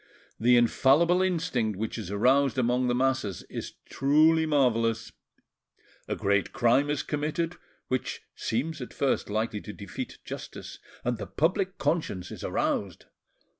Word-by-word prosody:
The 120 +2 +5
infallible 145 +9 +4
instinct 165 - 0
which 110 +2 -3
is 105 - -6
aroused 130 +5 +3
among 125 0 +2
the 120 - +1
masses 130 -6 0
is - - -5
truly 155 +3 +4
marvellous; 115 -6 +1 1.0
a - - -1
great 100 -2 +1
crime 125 +5 +3
is 145 -1 0
committed, 155 +3 -2 0.3
which 130 -1 -2
seems 145 +6 -2
at 125 - -8
first 140 -5 0
likely 110 0 -1
to 105 - -8
defeat 100 -2 -7
justice, - - -8 0.3
and 120 -2 0
the - - -5
public 185 +4 0
conscience 95 - -1
is - - -8
aroused. 95 -5 -1
130 Hz, 135 wpm, -28 LUFS, 110-155 Hz, 1.0 s, The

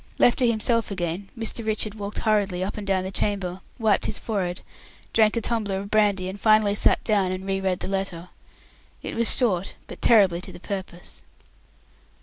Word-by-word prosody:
Left 240 - +4
to 250 - +3
himself 230 0 +1
again, 185 0 -4
Mr. 225 +1 0
Richard 215 -1 -1
walked 205 -1 -7
hurriedly 205 -4 +1
up 190 - -4
and 210 -2 -7
down 190 -1 +1
the 190 - -5
chamber, 190 -2 -1 0.2
wiped 220 -3 +1
his - - 0
forehead, 185 -5 -3 0.5
drank 215 0 +4
a - - 0
tumbler 210 -4 -1
of 200 +1 -7
brandy, 205 -3 +2
and 190 +1 -7
finally 215 -2 +4
sat 205 - +3
down 200 -4 +2
and 185 +1 -5
re 195 0 -1
read 185 -2 -1
the - - -3
letter. 190 -3 -3 0.7
It - - -5
was 230 0 +4
short, 195 -7 0
but - - -11
terribly 195 -7 +4
to - - -6
the - - -12
purpose. 185 -2 -7
200 Hz, 185 wpm, -24 LUFS, 185-215 Hz, 0.7 s, Left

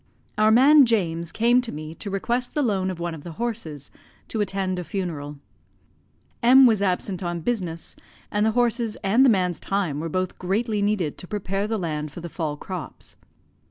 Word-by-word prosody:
Our 215 0 +4
man 270 +4 +7
James 170 -7 0
came 240 +2 +3
to 245 - -5
me 155 +1 -7
to 200 - -7
request 240 +6 -2
the 295 - +2
loan 195 -6 0
of 180 -2 -5
one 170 -1 -3
of 155 -3 -9
the 170 - -8
horses, 170 - -5 0.4
to 220 - -1
attend 190 -2 -1
a - - -4
funeral. 160 -5 -4 1.0
M 260 +2 +7
was 220 -5 +4
absent 185 -1 -1
on 175 -1 -3
business, 175 -6 -3 0.4
and 210 0 +1
the 220 0 +2
horses 235 -2 +1
and 215 +7 +4
the 270 - +6
man's 180 -6 +1
time 185 -8 -1
were 165 +2 -3
both 185 +2 -2
greatly 210 +3 -1
needed 200 -7 0
to 180 - -8
prepare 195 0 -2
the 220 0 -1
land 155 -5 -3
for 175 - -9
the 170 0 -7
fall 155 -3 -3
crops. 180 +1 -8
195 Hz, 190 wpm, -24 LUFS, 170-225 Hz, 1.0 s, man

